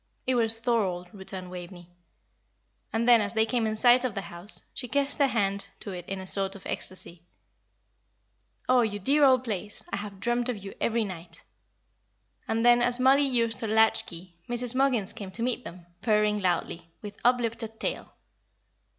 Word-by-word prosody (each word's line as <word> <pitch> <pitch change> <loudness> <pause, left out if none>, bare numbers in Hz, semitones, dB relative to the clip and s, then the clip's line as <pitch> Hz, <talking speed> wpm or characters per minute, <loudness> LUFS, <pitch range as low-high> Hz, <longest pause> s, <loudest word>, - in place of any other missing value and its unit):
"It 260 - +1
was 225 -2 0
Thorold," 195 -7 0
returned 190 -2 -8
Waveney. 175 -1 -9 1.0
And 230 +1 0
then, 240 -2 +7
as 205 +1 -3
they 220 0 +4
came 225 -1 0
in 215 - -1
sight 245 +3 +5
of 250 -5 -2
the 195 - -2
house, 185 +1 -4
she 250 - -5
kissed 280 +3 +1
her 280 - +5
hand 200 -5 -1
to 200 - -6
it 180 -2 -7
in 195 0 -3
a 190 - -7
sort 195 +1 0
of 195 - -12
ecstasy. 180 -2 -5 1.5
"Oh, 255 -1 +5
you 215 -3 -1
dear 280 +9 +3
old 260 -2 +5
place, 210 -3 -3
I - - +1
have 200 -1 -7
dreamt 240 +3 0
of 245 - -2
you 195 0 -9
every 230 0 +1
night!" 170 -4 -8 1.0
And 225 +1 0
then, 240 0 +6
as 245 0 +1
Mollie 270 +2 +5
used 230 -3 +2
her 225 - -3
latch 220 +1 +3
key, 175 +1 -10 0.2
Mrs. 240 0 0
Muggins 255 -7 +1
came 200 -2 -7
to 230 - -2
meet 250 0 -1
them, 175 -4 -10 0.2
purring 210 -1 +2
loudly, 170 -2 -1
with 205 -1 -8
uplifted 230 -2 0
tail. - - -4
220 Hz, 180 wpm, -27 LUFS, 195-240 Hz, 1.5 s, then